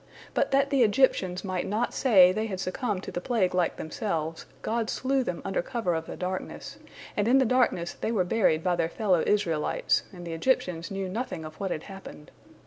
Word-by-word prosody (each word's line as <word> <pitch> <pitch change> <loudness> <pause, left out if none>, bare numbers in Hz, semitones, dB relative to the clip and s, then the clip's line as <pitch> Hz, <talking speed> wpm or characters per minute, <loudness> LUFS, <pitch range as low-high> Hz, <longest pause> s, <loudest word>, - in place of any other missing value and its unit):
But - - +1
that 275 +1 +2
the 275 -2 +3
Egyptians 205 -6 +2
might 185 -1 -2
not 220 +4 -1
say 190 -9 +6
they 215 +3 -1
had 190 -4 -4
succumbed 195 +1 -2
to - - -6
the 175 - -4
plague 205 -5 +1
like 180 -2 +1
themselves, 165 -3 -3 0.2
God 230 0 -1
slew 265 0 0
them 180 -7 -4
under 195 - 0
cover 225 -3 -2
of 160 0 -3
the - - -6
darkness, 185 +1 -5 0.4
and 205 +1 +1
in 255 +3 +5
the 265 - +4
darkness 225 -8 +1
they - - -3
were 205 -5 +2
buried 180 -5 +2
by 180 -1 +2
their 165 - 0
fellow 185 -4 +1
Israelites, 170 -7 +1
and 175 -2 -10
the 165 - -5
Egyptians 165 -4 0
knew 195 -1 -3
nothing 195 -4 -4
of 155 0 -10
what 195 - -2
had 155 - -3
happened. 195 -6 -11
190 Hz, 205 wpm, -27 LUFS, 175-230 Hz, 0.4 s, say